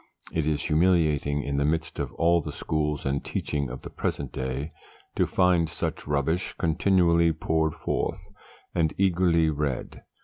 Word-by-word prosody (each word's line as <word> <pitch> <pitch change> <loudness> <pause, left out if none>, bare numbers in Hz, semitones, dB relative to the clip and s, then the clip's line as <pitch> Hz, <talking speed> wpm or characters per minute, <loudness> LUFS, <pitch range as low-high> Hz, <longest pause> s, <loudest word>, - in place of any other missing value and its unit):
It 80 -2 0
is 75 0 0
humiliating, 75 -4 +2
in 70 0 -2
the 70 - +2
midst 80 +2 -1
of - - -2
all 85 0 +3
the - - -6
schools 75 -2 -2
and 70 0 -1
teaching 70 -3 -2
of 65 - -8
the - - -8
present 70 -3 -3
day, 65 +4 -3 0.4
to - - +2
find 90 -3 +3
such - - -4
rubbish 75 +5 0
continually 85 -1 +3
poured 80 0 0
forth, - - -3 0.4
and 80 -3 +1
eagerly 85 -4 +3
read. 75 -3 -3
80 Hz, 150 wpm, -26 LUFS, 70-85 Hz, 0.4 s, all